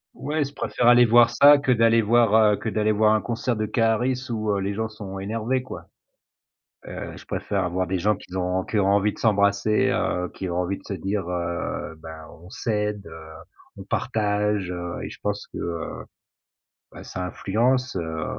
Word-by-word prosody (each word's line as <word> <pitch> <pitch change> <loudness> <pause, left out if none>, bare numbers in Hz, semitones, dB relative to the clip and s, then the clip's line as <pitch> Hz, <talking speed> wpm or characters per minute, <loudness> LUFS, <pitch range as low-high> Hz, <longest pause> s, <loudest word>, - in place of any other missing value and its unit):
Ouais, 150 +1 -1
je 140 +1 -7
préfère 120 -4 -1
aller 120 0 +7
voir 120 0 +6
ça 145 +5 +7
que 135 -2 0
d'aller 115 -1 +4
voir, 115 0 +3 0.2
heu, - - -1
que - - -6
d'aller 110 0 +1
voir 110 +1 +3
un 110 - +2
concert 120 +1 -2
de 110 0 -1
Karris 120 +3 +1
où, 110 -2 -2
heu, 100 - 0
les 100 +1 -2
gens 110 +1 -3
sont 100 -3 -8
énervés, 115 +6 -2
quoi. 130 - -9 1.0
Heu, - - -7
je - - -12
préfère 100 -2 -2
avoir 90 +1 -1
des 95 +1 -1
gens 105 +3 +1
qui 90 - -15
ont 95 0 -1
qui 110 - -2
ont 95 - +2
envie 100 +1 +3
de - - -15
s'embrasser, 100 0 +2
heu, 90 0 -1
qui 95 - -5
ont 85 - -3
envie 90 +2 -1
de - - -19
se 100 - -5
dire, 95 0 -3
heu: 85 -2 -3
«Bah, 80 -1 -9 0.2
on 90 - -13
s'aide, 105 -2 -2
heu, 80 -1 -11 0.5
on 95 - -9
partage», 105 -4 -1
heu 85 -1 -5
et - - -6
je - - -11
pense - - -3
que, - - -9
heu, 85 -1 -4 1.0
bah, - - -10
ça 90 - -5
influence, 125 +8 0
heu. 80 -1 -3
105 Hz, 200 wpm, -24 LUFS, 95-115 Hz, 1.0 s, aller